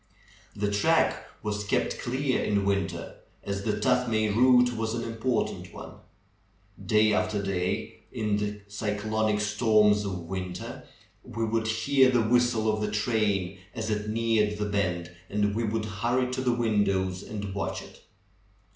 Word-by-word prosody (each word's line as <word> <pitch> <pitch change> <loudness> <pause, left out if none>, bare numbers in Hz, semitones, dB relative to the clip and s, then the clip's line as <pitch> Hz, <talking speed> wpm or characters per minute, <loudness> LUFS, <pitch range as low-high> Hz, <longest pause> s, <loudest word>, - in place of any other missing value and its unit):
The 105 0 -1
track 100 0 +2 0.2
was 105 -1 -2
kept 100 - 0
clear 130 +2 0
in 100 -1 +1
winter, 100 -3 -2 0.3
as 100 0 -3
the 105 - 0
Tuthmay 115 -2 +2
route 125 0 +5
was 110 0 -2
an 115 - -3
important 115 +1 -2
one. - - -10 0.9
Day 110 0 +3
after 105 0 0
day 95 -2 -2
in 105 -1 0
the 105 0 -3
cy 105 +1 -3
clonic 110 0 0
storms 105 -1 +3
of 95 -3 -4
winter, 90 +1 -6 0.4
we 115 +1 -3
would 110 0 0
hear 130 +4 +3
the 125 -3 +3
whistle 120 -1 +2
of 105 - -2
the 105 - 0
train 105 -4 0 0.2
as 110 -2 -3
it 105 0 -2
neared 110 -2 +1
the 105 - -1
bend, 90 -4 -1 0.2
and 105 0 +1
we 115 +2 -1
would 110 0 -1
hurry 120 +5 0
to 130 - -1
the 125 -1 +2
windows 100 -5 +1
and 100 -2 -6
watch 100 - -3
it. - - -15
105 Hz, 155 wpm, -27 LUFS, 100-115 Hz, 0.9 s, route